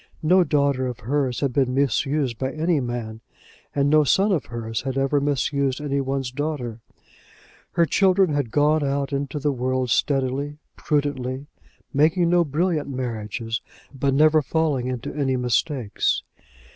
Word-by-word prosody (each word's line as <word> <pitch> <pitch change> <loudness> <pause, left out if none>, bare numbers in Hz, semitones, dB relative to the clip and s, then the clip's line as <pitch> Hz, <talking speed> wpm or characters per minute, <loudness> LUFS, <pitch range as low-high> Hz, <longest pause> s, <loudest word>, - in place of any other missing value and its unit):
No 180 +4 +5
daughter 140 -4 +1
of 125 -1 -6
hers 130 0 -1
had 140 -3 0
been 130 -1 +1
misused 135 -1 0
by 130 0 -1
any 160 0 +1
man, 120 -3 -4 0.5
and 140 0 +2
no 155 +1 +5
son 195 +8 +3
of 160 - 0
hers 115 -1 -4
had 135 0 -3
ever 135 +1 +2
misused 140 -1 0
any 140 -1 -1
one's 135 -1 -2
daughter. 135 -5 -3 0.9
Her 170 - +4
children 190 -1 +3
had 140 -5 0
gone 150 +4 +2
out 140 0 -1
into 140 +1 -2
the 145 0 0
world 130 -1 -1
steadily, 140 +2 0 0.2
prudently, 140 -2 -2 0.5
making 165 +4 +3
no 175 -1 +4
brilliant 155 0 -1
marriages, 115 -3 -4 0.3
but 135 0 0
never 155 +1 +5
falling 145 -3 0
into 125 -2 -4
any 135 -3 0
mistakes. 125 -2 0
140 Hz, 145 wpm, -23 LUFS, 125-150 Hz, 0.9 s, No